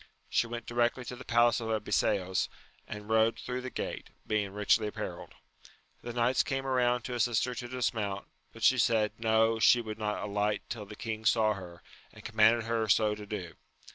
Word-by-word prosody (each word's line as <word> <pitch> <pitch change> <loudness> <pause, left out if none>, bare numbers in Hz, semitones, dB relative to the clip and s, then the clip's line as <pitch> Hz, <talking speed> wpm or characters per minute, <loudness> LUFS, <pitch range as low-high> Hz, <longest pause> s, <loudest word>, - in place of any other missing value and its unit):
She 120 - +2
went 120 0 -6
directly 120 +1 0
to 125 - -6
the 125 - -10
palace 120 0 +3
of 115 -1 -4
Abiseos, 100 -3 0 0.4
and 105 0 -7
rode 110 +1 +3
through 125 0 -4
the 130 - -5
gate, - - -5 0.2
being 105 -2 -1
richly 105 +2 +2
apparelled. 105 - -6 0.7
The 120 - -6
knights 120 +2 +2
came 135 0 -2
around 125 -2 +1
to 125 - -5
assist 120 -2 +1
her 125 - -4
to 120 0 -6
dismount; 110 -5 -2 0.3
but 115 - -11
she 130 +3 +5
said. 110 -2 +3
No, 110 0 +3
she 120 - +6
would 110 -2 -6
not 105 -1 -2
alight 105 0 -1
till 110 -4 -5
the 105 - -9
king 110 -1 -5
saw 110 -1 +3
her, 90 -4 -10 0.3
and - - -15
commanded 110 +1 +4
her 115 -1 -1
so 105 +1 +4
to 105 0 -8
do. 95 -5 -5
110 Hz, 190 wpm, -30 LUFS, 105-120 Hz, 0.7 s, she